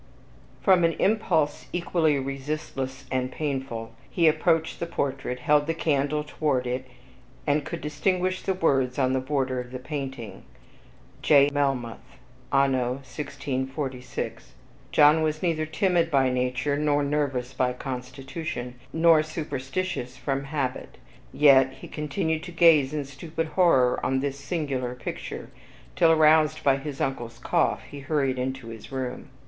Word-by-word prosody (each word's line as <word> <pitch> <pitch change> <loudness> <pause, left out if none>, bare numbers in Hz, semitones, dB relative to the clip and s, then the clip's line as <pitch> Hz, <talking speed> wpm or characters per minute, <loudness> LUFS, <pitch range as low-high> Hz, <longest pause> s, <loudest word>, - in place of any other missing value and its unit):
From 185 -3 +5
an 165 0 +3
impulse 190 -8 +1
equally 170 -4 +1
resistless 135 0 -4
and 130 -1 -1
painful, 135 -6 -3 0.2
he 170 -3 +3
approached 160 +1 +2
the 170 - -3
portrait, 135 -5 -3
held 145 +2 +3
the 165 - 0
candle 150 -1 0
toward 145 -4 -1
it, 125 +1 -3 0.6
and 145 +1 +2
could - - -6
distinguish 185 +5 0
the 190 - -1
words 135 -7 +1
on 130 -2 +2
the 130 - +2
border 130 -1 -1
of 125 0 -6
the 130 - -4
painting, 130 -7 -6 0.8
Jno. 145 -1 +5
Melmoth, 135 -5 -2 0.3
anno 130 -3 +2
1646. 135 -2 -5 0.4
John 150 +1 +6
was 155 +1 -1
neither 160 -3 0
timid 170 +1 +1
by 135 -4 +3
nature, 125 +3 0
nor 145 -1 +2
nervous 140 -3 -1
by 125 -1 +1
constitution, 125 0 -6
nor 165 -1 +5
superstitious 150 -2 -4
from 135 -1 -2
habit, 135 -3 -3 0.3
yet 135 -3 +5
he - - -11
continued 155 +1 -2
to 175 - -8
gaze 160 -5 +5
in 150 -2 -3
stupid 160 +4 -5
horror 135 -10 +3
on 130 0 +1
this 140 0 -3
singular 140 -5 -3
picture, 125 - -6 0.4
till, 165 - +5
aroused 155 -1 +4
by 135 -1 +4
his 140 0 -6
uncle's 120 -3 -3
cough, 170 +7 +1
he 145 - -10
hurried 135 -2 0
into 130 -2 -3
his 115 +2 -10
room. 130 -2 -4
140 Hz, 140 wpm, -26 LUFS, 130-155 Hz, 0.8 s, John